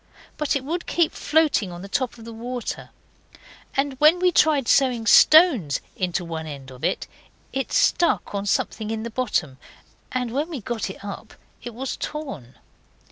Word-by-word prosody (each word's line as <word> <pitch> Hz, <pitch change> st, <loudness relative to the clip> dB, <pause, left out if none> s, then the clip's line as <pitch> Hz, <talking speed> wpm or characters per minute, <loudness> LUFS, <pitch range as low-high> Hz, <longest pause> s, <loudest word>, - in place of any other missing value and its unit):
But 300 Hz, -2 st, -1 dB
it 275 Hz, -, -1 dB
would 335 Hz, +5 st, -4 dB
keep 340 Hz, -2 st, +2 dB
floating 300 Hz, -, +1 dB
on 175 Hz, +1 st, -8 dB
the -, -, -7 dB
top 255 Hz, +3 st, -2 dB
of 225 Hz, -, -12 dB
the 230 Hz, -, -8 dB
water, 240 Hz, +2 st, -5 dB, 0.9 s
and 275 Hz, 0 st, +1 dB
when 310 Hz, +4 st, +6 dB
we 360 Hz, 0 st, +3 dB
tried 300 Hz, -6 st, +3 dB
sewing 250 Hz, -4 st, +3 dB
stones 265 Hz, -, +6 dB, 0.2 s
into 180 Hz, -1 st, -2 dB
one 160 Hz, -1 st, -5 dB
end 135 Hz, -3 st, -9 dB
of 130 Hz, 0 st, -13 dB
it, -, -, 0 dB, 0.5 s
it 270 Hz, 0 st, -2 dB
stuck 345 Hz, -, +2 dB
on 200 Hz, 0 st, -3 dB
something 215 Hz, +2 st, -1 dB
in 220 Hz, 0 st, -3 dB
the 235 Hz, -, -5 dB
bottom, 195 Hz, -, -1 dB, 0.5 s
and 250 Hz, -2 st, -2 dB
when 290 Hz, +7 st, -1 dB
we 310 Hz, -6 st, -5 dB
got 225 Hz, -1 st, -4 dB
it 190 Hz, -, -9 dB
up 200 Hz, -, -8 dB, 0.3 s
it 240 Hz, -2 st, -8 dB
was 265 Hz, +2 st, -4 dB
torn. 270 Hz, -, -6 dB
240 Hz, 175 wpm, -23 LUFS, 195-285 Hz, 0.9 s, when